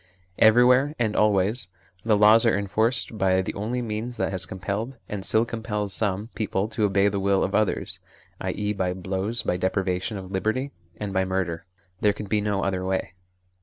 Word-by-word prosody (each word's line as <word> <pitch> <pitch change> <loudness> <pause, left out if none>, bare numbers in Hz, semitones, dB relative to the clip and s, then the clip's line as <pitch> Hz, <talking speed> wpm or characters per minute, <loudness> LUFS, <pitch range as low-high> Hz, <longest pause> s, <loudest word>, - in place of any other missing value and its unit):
Everywhere 125 +6 +5
and 110 -3 0
always 105 0 +2 0.4
the 110 -2 +3
laws 105 +2 +6
are 115 -4 +3
enforced 110 +3 0
by 95 0 +3
the - - -4
only 120 +5 -3
means 115 +2 -4
that - - -1
has 95 -1 -2
compelled, 100 +7 -4
and 100 -2 -5
still 110 +4 +3
compels, 105 -4 -3
some 105 +1 -1
people 105 -2 -1
to 110 -1 0
obey 100 0 +3
the 100 -1 0
will 95 0 +2
of 95 - -2
others, 110 -2 0 0.4
i.e. 105 0 -2
by 95 -3 -1
blows, 95 +5 -2
by 90 - 0
deprivation 95 +2 -1
of 95 -1 -8
liberty, 110 +8 -1 0.3
and 100 0 -4
by 95 -1 +2
murder. 95 -2 -2 0.3
There 105 -1 +3
can 105 - -7
be 105 +1 0
no 100 -1 -1
other 95 -1 -1
way. 95 0 -2
105 Hz, 180 wpm, -25 LUFS, 95-110 Hz, 0.4 s, laws